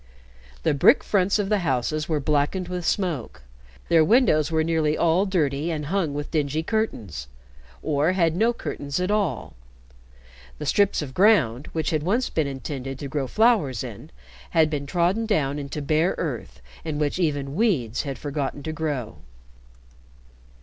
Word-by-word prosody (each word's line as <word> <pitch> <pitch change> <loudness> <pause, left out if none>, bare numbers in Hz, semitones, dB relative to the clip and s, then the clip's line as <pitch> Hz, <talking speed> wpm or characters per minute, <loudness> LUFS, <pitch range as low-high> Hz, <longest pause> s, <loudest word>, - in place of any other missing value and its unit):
The - - +2
brick 140 - +5
fronts 195 0 +2
of 205 -2 -1
the 210 -1 +2
houses 155 0 -1
were 155 -2 +1
blackened 150 +6 0
with 180 -2 -3
smoke, 170 - -2 0.4
their 165 -2 +5
windows 155 - +4
were 160 -1 +1
nearly 155 -2 +1
all 170 +4 +2
dirty 155 -4 0
and 155 -3 -3
hung 165 -8 0
with 145 0 -5
dingy 155 0 0
curtains, 120 - -3 0.6
or 150 +4 +1
had 165 -3 +2
no 225 +6 +3
curtains 145 -10 -4
at 180 +2 0
all; 200 - -1 1.0
the - - -6
strips 200 -6 +2
of 130 -3 -8
ground, 155 - +3
which 160 -1 -1
had 155 -2 0
once 220 +11 0
been 155 -3 0
intended 135 -1 -5
to 140 - -6
grow 140 -1 -2
flowers 210 - +2
in, - - -9 0.4
had 160 -1 +3
been 140 -2 -3
trodden 180 +8 +1
down 145 -9 0
into 140 +1 -5
bare 155 +5 +1
earth - - -5 0.2
in 155 -3 -3
which 150 +3 -1
even 145 -5 -1
weeds 155 - +1
had 140 -3 -5
forgotten 145 0 -4
to 155 - -4
grow. 150 -8 -3
155 Hz, 160 wpm, -24 LUFS, 140-180 Hz, 1.0 s, brick